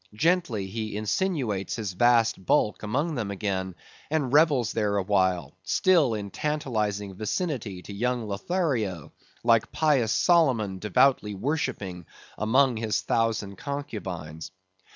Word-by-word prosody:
Gently 145 Hz, -, +1 dB
he 110 Hz, +1 st, -4 dB
insinuates 110 Hz, -, -1 dB
his 105 Hz, -5 st, -4 dB
vast 115 Hz, 0 st, +3 dB
bulk 105 Hz, +3 st, +1 dB
among 140 Hz, +10 st, -1 dB
them 115 Hz, -7 st, -3 dB
again 95 Hz, -2 st, -3 dB, 0.3 s
and 145 Hz, -4 st, -1 dB
revels 145 Hz, -7 st, +4 dB
there 105 Hz, -2 st, 0 dB
awhile, 95 Hz, -6 st, +1 dB
still 150 Hz, -, +3 dB
in 100 Hz, -2 st, -5 dB
tantalizing 110 Hz, -10 st, -2 dB
vicinity 110 Hz, -, -3 dB
to 100 Hz, -, -9 dB
young 120 Hz, +2 st, -1 dB
Lothario, 110 Hz, -, -2 dB, 0.3 s
like 115 Hz, -2 st, +3 dB
pious 140 Hz, -8 st, +2 dB
Solomon 125 Hz, -, +2 dB
devoutly 105 Hz, 0 st, +2 dB
worshipping 95 Hz, -, -3 dB, 0.3 s
among 125 Hz, +3 st, +2 dB
his 110 Hz, -4 st, -1 dB
thousand 105 Hz, -1 st, -1 dB
concubines. 95 Hz, -, -6 dB
110 Hz, 115 wpm, -26 LUFS, 100-140 Hz, 0.3 s, revels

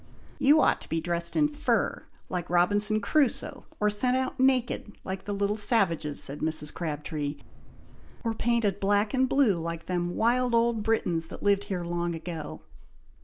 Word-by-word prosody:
"You 290 Hz, +3 st, +5 dB
ought -, -, +3 dB
to -, -, -14 dB
be 165 Hz, -, 0 dB
dressed 170 Hz, 0 st, -2 dB
in 300 Hz, -1 st, +4 dB
fur, 295 Hz, 0 st, -1 dB, 0.2 s
like 180 Hz, -2 st, -4 dB
Robinson 205 Hz, +5 st, +3 dB
Crusoe, 280 Hz, -1 st, 0 dB
or 210 Hz, 0 st, +2 dB
sent 250 Hz, +5 st, +1 dB
out 260 Hz, 0 st, -3 dB
naked, 255 Hz, -5 st, +1 dB
like 190 Hz, 0 st, -5 dB
the 205 Hz, -, -4 dB
little 200 Hz, +1 st, 0 dB
savages," 170 Hz, -, +1 dB
said 140 Hz, +2 st, -4 dB
Mrs. 155 Hz, -1 st, -1 dB
Crabtree, 150 Hz, -2 st, -4 dB, 0.9 s
"or 230 Hz, -1 st, 0 dB
painted 225 Hz, -3 st, 0 dB
black 205 Hz, +3 st, +1 dB
and 260 Hz, -1 st, +2 dB
blue 245 Hz, -11 st, +3 dB
like 165 Hz, 0 st, -5 dB
them 175 Hz, -1 st, -2 dB
wild 245 Hz, +1 st, +2 dB
old 230 Hz, -1 st, +2 dB
Britons 180 Hz, -7 st, 0 dB
that -, -, -10 dB
lived 200 Hz, 0 st, +2 dB
here 190 Hz, -4 st, -3 dB
long 170 Hz, 0 st, -2 dB
ago!" 165 Hz, -2 st, -7 dB
200 Hz, 165 wpm, -27 LUFS, 170-235 Hz, 0.9 s, You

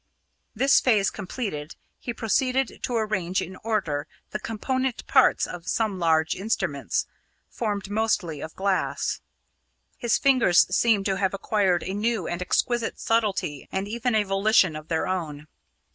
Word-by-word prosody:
This 270 Hz, +5 st, +5 dB
phase 210 Hz, -6 st, +3 dB
completed, 190 Hz, -, -5 dB, 0.2 s
he 240 Hz, -, -4 dB
proceeded 255 Hz, +3 st, 0 dB
to 245 Hz, -, -1 dB
arrange 190 Hz, -5 st, 0 dB
in 185 Hz, +2 st, -5 dB
order 165 Hz, -10 st, -2 dB, 0.2 s
the 215 Hz, -, -3 dB
component 255 Hz, +4 st, -2 dB
parts -, -, +4 dB
of 175 Hz, -1 st, -8 dB
some 215 Hz, -4 st, 0 dB
large 160 Hz, -2 st, +2 dB
instruments, 175 Hz, -, -1 dB, 0.5 s
formed 205 Hz, -4 st, -2 dB
mostly 205 Hz, -8 st, 0 dB
of 160 Hz, -, -7 dB
glass. 195 Hz, -1 st, -1 dB, 0.8 s
His 235 Hz, -2 st, +1 dB
fingers 255 Hz, -10 st, +5 dB
seemed 215 Hz, -4 st, +3 dB
to 195 Hz, -2 st, 0 dB
have 190 Hz, 0 st, 0 dB
acquired 195 Hz, -3 st, +1 dB
a 190 Hz, -, -4 dB
new 215 Hz, -2 st, -1 dB
and 175 Hz, +1 st, -3 dB
exquisite 240 Hz, +5 st, 0 dB
subtlety 205 Hz, -10 st, -1 dB
and 190 Hz, +1 st, -2 dB
even 235 Hz, +2 st, -1 dB
a 215 Hz, -, +3 dB
volition 195 Hz, -3 st, +3 dB
of 155 Hz, 0 st, -8 dB
their 160 Hz, -1 st, -1 dB
own. 155 Hz, -5 st, -3 dB
200 Hz, 145 wpm, -25 LUFS, 175-225 Hz, 0.8 s, This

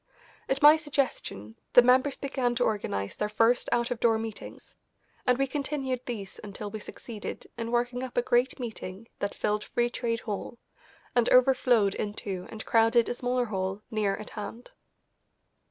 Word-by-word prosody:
At 270 Hz, +1 st, 0 dB
my 300 Hz, +2 st, +10 dB
suggestion 270 Hz, -, -3 dB, 0.2 s
the 245 Hz, -, +9 dB
members 255 Hz, +3 st, +4 dB
began 260 Hz, -3 st, -1 dB
to 245 Hz, -, +2 dB
organise 100 Hz, -, -1 dB
their 210 Hz, -, -2 dB
first 225 Hz, +3 st, +2 dB
out 240 Hz, 0 st, +1 dB
of 240 Hz, -, -2 dB
door 230 Hz, -1 st, +4 dB
meetings, 220 Hz, -1 st, -8 dB, 0.5 s
and 250 Hz, -1 st, +4 dB
we 275 Hz, -, +2 dB
continued 270 Hz, -2 st, -3 dB
these 205 Hz, -6 st, -5 dB
until 205 Hz, 0 st, -6 dB
we 215 Hz, -, -5 dB
succeeded 215 Hz, 0 st, -7 dB
in 230 Hz, -1 st, -4 dB
working 245 Hz, +1 st, 0 dB
up 255 Hz, -1 st, -6 dB
a 245 Hz, -, +3 dB
great 245 Hz, +3 st, +2 dB
meeting 220 Hz, -3 st, -7 dB
that 200 Hz, -, -2 dB
filled 210 Hz, 0 st, 0 dB
Free 240 Hz, 0 st, 0 dB
Trade 230 Hz, -2 st, -2 dB
Hall, 215 Hz, +3 st, -5 dB, 0.6 s
and 240 Hz, -1 st, +4 dB
overflowed 250 Hz, -5 st, +4 dB
into 200 Hz, -3 st, -4 dB
and 220 Hz, -1 st, -8 dB
crowded 225 Hz, +1 st, +4 dB
a -, -, 0 dB
smaller 245 Hz, 0 st, 0 dB
hall 195 Hz, -1 st, -3 dB
near 210 Hz, -3 st, +1 dB
at 215 Hz, -, -9 dB
hand. 220 Hz, +3 st, -7 dB
235 Hz, 165 wpm, -28 LUFS, 210-250 Hz, 0.6 s, my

